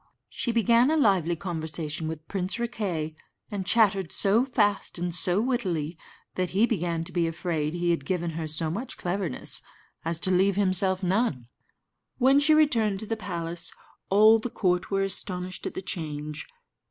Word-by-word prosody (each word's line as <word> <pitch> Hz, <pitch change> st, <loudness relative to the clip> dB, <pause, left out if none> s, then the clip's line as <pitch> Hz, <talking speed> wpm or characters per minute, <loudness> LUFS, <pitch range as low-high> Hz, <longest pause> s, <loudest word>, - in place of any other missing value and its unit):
She 240 Hz, -, -2 dB
began 235 Hz, +2 st, +4 dB
a 320 Hz, -, +2 dB
lively 190 Hz, -, +3 dB
conversation 160 Hz, -2 st, -4 dB
with 160 Hz, 0 st, -6 dB
Prince 190 Hz, -1 st, -2 dB
Riquet, 200 Hz, -10 st, -3 dB, 0.4 s
and 195 Hz, -3 st, -4 dB
chattered 200 Hz, -5 st, +3 dB
so 215 Hz, +6 st, +3 dB
fast 205 Hz, -8 st, +1 dB
and 175 Hz, 0 st, -2 dB
so 180 Hz, +2 st, +3 dB
wittily, 185 Hz, -, -1 dB, 0.4 s
that 185 Hz, -1 st, -1 dB
he 220 Hz, -, +6 dB
began 175 Hz, -8 st, -1 dB
to 175 Hz, -, -9 dB
be 170 Hz, -2 st, +1 dB
afraid 165 Hz, -2 st, -2 dB
he 175 Hz, 0 st, +1 dB
had 165 Hz, -5 st, -1 dB
given 175 Hz, +2 st, -2 dB
her 160 Hz, 0 st, -4 dB
so 155 Hz, +1 st, +1 dB
much 235 Hz, +9 st, -5 dB
cleverness 180 Hz, -5 st, -1 dB, 0.4 s
as 165 Hz, 0 st, -2 dB
to 190 Hz, -, +4 dB
leave 190 Hz, +1 st, +3 dB
himself 190 Hz, -1 st, +3 dB
none. 185 Hz, -, 0 dB, 0.7 s
When 270 Hz, +2 st, +5 dB
she 305 Hz, +2 st, +4 dB
returned 230 Hz, -10 st, +3 dB
to -, -, -6 dB
the 225 Hz, -, -2 dB
palace, 170 Hz, -5 st, -4 dB, 0.4 s
all 215 Hz, +3 st, +6 dB
the 245 Hz, -, -4 dB
court 180 Hz, -4 st, 0 dB
were 195 Hz, -1 st, +1 dB
astonished 185 Hz, -1 st, -4 dB
at -, -, -7 dB
the 190 Hz, -, -5 dB
change. 150 Hz, -3 st, -5 dB
185 Hz, 165 wpm, -26 LUFS, 165-215 Hz, 0.7 s, he